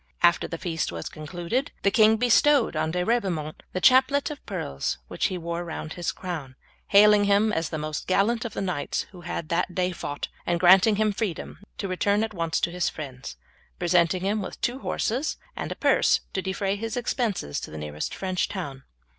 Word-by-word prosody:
After 170 0 +4
the 165 - -5
feast 165 - -2
was 85 -1 -5
concluded 175 - -3
the 200 - +4
king 220 +1 +5
bestowed 245 - +4
on 155 0 0
De 180 +2 -1
Ribaumont 180 -10 -1
the 185 - -2
chaplet 265 - +4
of 295 - -9
pearls 70 - -3
which - - 0
he 185 - -4
wore 170 0 -3
round 160 -1 -6
his 175 -1 -2
crown, 160 -8 -6 0.3
hailing 205 0 +6
him 205 +2 +3
as 165 -3 -1
the 160 - -3
most 155 0 -4
gallant 215 +5 +2
of 230 - -5
the - - -3
knights 180 -7 -2
who 180 -2 -12
had 170 -1 -5
that 175 +1 0
day 185 0 +1
fought, 145 -4 -5 0.2
and 175 -1 0
granting 190 +4 +6
him 215 0 +2
freedom 200 -4 -4 0.2
to 200 - -3
return 200 +3 +1
at 220 -1 -3
once 165 -3 -1
to 170 - 0
his 180 -1 0
friends, 135 - -8 0.4
presenting 175 +1 +2
him 205 +2 0
with 190 - -7
two 245 +2 -1
horses, 265 +2 -1 0.2
and - - -4
a - - -3
purse - - +3
to 190 - -1
defray 195 +1 -1
his 225 +3 -4
expenses 225 - -1
to - - -7
the 80 - -8
nearest 75 0 -4
French 185 -1 -1
town. 145 -9 -5
185 Hz, 195 wpm, -26 LUFS, 165-215 Hz, 0.4 s, hailing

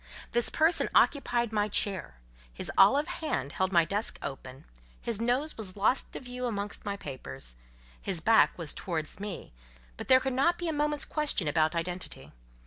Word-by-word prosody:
This 240 0 +2
person 320 +2 +2
occupied 240 -5 +3
my 210 -1 +2
chair; 195 - 0 0.4
his - - -3
olive 275 +11 +5
hand 220 - -3
held 190 +4 -1
my 170 -3 +5
desk 205 +6 -2
open, 135 -1 -7 0.3
his 230 -2 -2
nose 255 +6 0
was 205 -3 -4
lost 215 +6 +1
to - - -5
view 250 0 -5
amongst 205 -3 -4
my 200 -1 -3
papers. 65 - -8 0.5
His 190 -4 -1
back 225 +7 +4
was 165 -4 -3
towards 165 -1 -4
me, 200 - -6 0.4
but - - -7
there 260 - +7
could 265 0 -2
not 335 +7 +2
be 350 - -4
a 320 - 0
moment's 295 0 0
question 300 - +1
about 155 +2 +2
identity. 170 - -4
205 Hz, 170 wpm, -29 LUFS, 165-260 Hz, 0.5 s, there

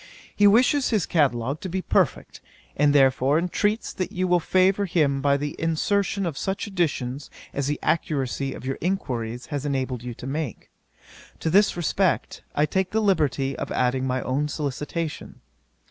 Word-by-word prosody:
He 205 - +5
wishes 255 +6 +4
his 215 -7 +1
catalogue 140 -3 +1
to 190 - -5
be 185 +1 -3
perfect, - - 0 0.3
and 145 0 +3
therefore 135 0 +4
intreats 205 +5 -1
that 185 - -3
you 185 +1 -1
will 180 0 +4
favour 185 +4 +2
him 145 -6 +1
by 140 0 +3
the 145 +1 -4
insertion 195 +5 0
of 160 -5 -3
such 195 0 -2
additions 150 - -2 0.2
as 140 -1 -1
the 145 0 -1
accuracy 140 -4 -1
of - - -10
your 135 0 -3
inquiries 125 -10 -2
has 145 -1 -2
enabled 130 -4 -2
you 120 -1 -6
to - - -9
make. 140 -2 -4 0.7
To 160 - 0
this 200 +1 +4
request, 180 +2 0
I 150 - +3
take 190 +4 -1
the 220 - 0
liberty 145 - +1
of - - -5
adding 130 +1 +1
my 130 0 -1
own 140 +3 0
solicitation. 150 +2 -4
150 Hz, 165 wpm, -24 LUFS, 135-185 Hz, 0.7 s, He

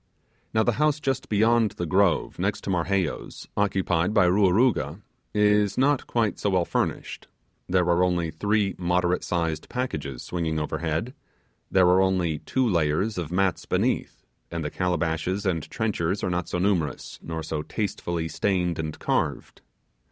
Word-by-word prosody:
Now, 110 - +3
the 120 - +2
house 150 -1 +3
just 135 -3 -2
beyond 110 +1 +3
the 90 - -4
grove, 95 +2 +2
and - - -17
next - - -1
to - - -3
Marheyo's, 90 -1 -2
occupied 95 -2 +1
by 100 -4 +6
Ruaruga, 95 - +3 0.3
is 105 -1 +3
not 140 +1 +2
quite 115 -3 0
so 100 - 0
well 90 -3 +2
furnished. - - -3 0.4
There 90 -1 +3
are 85 +1 +3
only 90 -3 0
three 100 +4 0
moderate 90 0 +1
sized 80 -3 -2
packages 75 - -4
swinging 80 -3 -2
overhead: 80 - -2 0.6
there 95 -1 +4
are 90 +1 +5
only 90 -5 +1
two 130 -1 0
layers 90 +3 +1
of 85 -2 -5
mats 95 0 0
beneath; - - -1 0.2
and 85 -2 -4
the 75 - -3
calabashes 90 +2 -1
and 85 -5 -1
trenchers 100 -4 -1
are 90 - 0
not 90 -1 -2
so - - -1
numerous, 90 -6 -1
nor 80 -1 -5
so 80 -1 -3
tastefully 85 -2 -3
stained 90 -2 0
and 80 -1 -4
carved. - - -2
90 Hz, 155 wpm, -25 LUFS, 85-105 Hz, 0.6 s, by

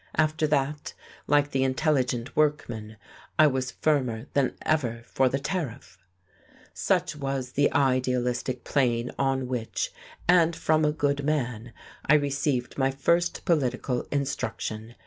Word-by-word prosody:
After 155 0 +2
that, 145 0 -1 0.3
like 145 0 +3
the 135 -1 +1
intelligent 130 -3 0
workman, 115 -8 0 0.4
I 155 - +7
was 130 -3 +1
firmer 125 -4 0
than 140 -2 +1
ever 120 -7 0
for 130 +2 +2
the 135 - 0
Tariff. 140 - -4 0.7
Such 180 -3 0
was 135 -3 -3
the 145 +2 +2
idealistic 125 -2 0
plane 125 -3 +1
on 135 -1 +1
which 125 -3 -3 0.3
and 170 -2 +5
from 155 -1 +2
a 150 - +3
good 145 -2 0
man 125 -6 -1 0.4
I 150 - +6
received 140 -3 0
my 135 0 +3
first 170 +6 0
political 130 -5 0
instruction! 120 -5 -3
135 Hz, 125 wpm, -27 LUFS, 125-150 Hz, 0.7 s, I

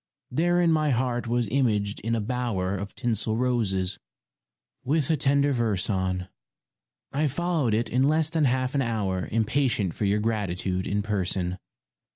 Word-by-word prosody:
Therein 175 +4 +3
my 155 -1 +2
heart 120 -2 0
was 120 -1 +1
imaged 105 -6 +1
in 115 +2 -1
a - - 0
bower 105 -5 -1
Of 100 +1 -6
tinsel 110 -2 -1
roses, 105 -7 0 0.8
with 150 +2 +1
a - - +4
tender 140 0 +2
verse 110 -5 0
on; 95 -1 -1 0.9
I 150 +3 +2
followed 150 -5 0
it 115 +2 0
in 130 +3 +2
less 155 +1 +2
than 160 -1 +1
half 130 0 +1
an 140 - +1
hour 105 -7 -1
Impatient 115 - +1
for 105 - -2
your 100 +1 +2
gratitude 95 -4 -1
in 100 +1 0
person. 95 -3 -1
115 Hz, 155 wpm, -26 LUFS, 100-135 Hz, 0.9 s, a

